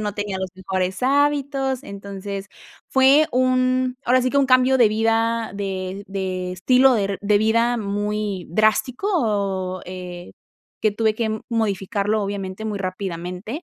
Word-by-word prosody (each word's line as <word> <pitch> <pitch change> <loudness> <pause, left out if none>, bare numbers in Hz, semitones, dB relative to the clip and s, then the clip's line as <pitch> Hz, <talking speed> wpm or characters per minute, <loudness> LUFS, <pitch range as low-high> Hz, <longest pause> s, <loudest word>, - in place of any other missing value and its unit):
no 210 -1 -3
tenía 205 -2 -3
los 190 -1 -4
mejores 185 +1 -3
hábitos, 275 -1 +1
entonces, 200 -1 -7 0.4
fue 270 +3 +5
un 255 0 +2
ahora 255 +2 +4
sí 255 - +1
que 280 - -1
un 280 - +5
cambio 255 +1 +4
de 240 -4 +5
vida, 225 +1 0
de 195 0 -4
de 185 -2 -3
estilo 255 +8 +4
der 200 -3 -1
de 205 0 +3
vida 230 +3 +2
muy 205 -2 -2
drástico, 215 - 0
eh, 180 -1 -8 0.5
que 215 - +4
tuve 220 +1 +1
que 220 -1 -2
modificarlo 210 -1 0
obviamente 195 0 -4
muy 210 -2 -3
rápidamente. 185 - -5
210 Hz, 135 wpm, -22 LUFS, 195-250 Hz, 0.5 s, fue